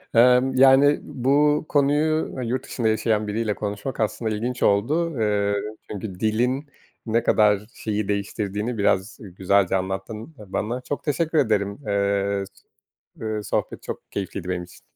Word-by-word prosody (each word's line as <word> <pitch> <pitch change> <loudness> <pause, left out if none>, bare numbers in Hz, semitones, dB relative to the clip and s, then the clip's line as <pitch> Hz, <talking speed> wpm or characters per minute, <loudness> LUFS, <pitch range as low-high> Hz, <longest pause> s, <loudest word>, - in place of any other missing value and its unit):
Imm, 125 +2 +5
yani, 135 +2 +6
bu 145 +4 +2
konuyu 150 +2 +2
ı 130 - -3
yurt 125 +3 -2
dışında 115 -3 -2
yaşayan 110 -1 +1
biriyle 105 0 -1
konuşmak 105 +6 -4
aslında 110 +1 -1
ilginç 120 +3 -3
oldu. 150 +12 +2
Iıı, 100 -1 +1 0.4
çünkü 100 -3 -6
dilin 125 +7 0 0.4
ne 115 0 +1
kadar 105 -2 +4
şeyi 105 -2 -3
değiştirdiğini 105 +2 -2
biraz 100 0 +1
güzelce 95 -1 +1
anlattın 95 +8 -4
a 105 -3 -13
bana. 120 +4 -2
Çok 140 +3 -4
teşekkür 160 +2 0
ederim. 100 -6 +1
Iıı, 100 0 0
s 100 - -24 0.6
ııı, 110 -1 -3
sohbet - - -2
çok - - -7
keyifliydi 95 -2 -4
benim 90 -1 -2
için. 85 - -17
110 Hz, 145 wpm, -24 LUFS, 100-130 Hz, 0.6 s, yani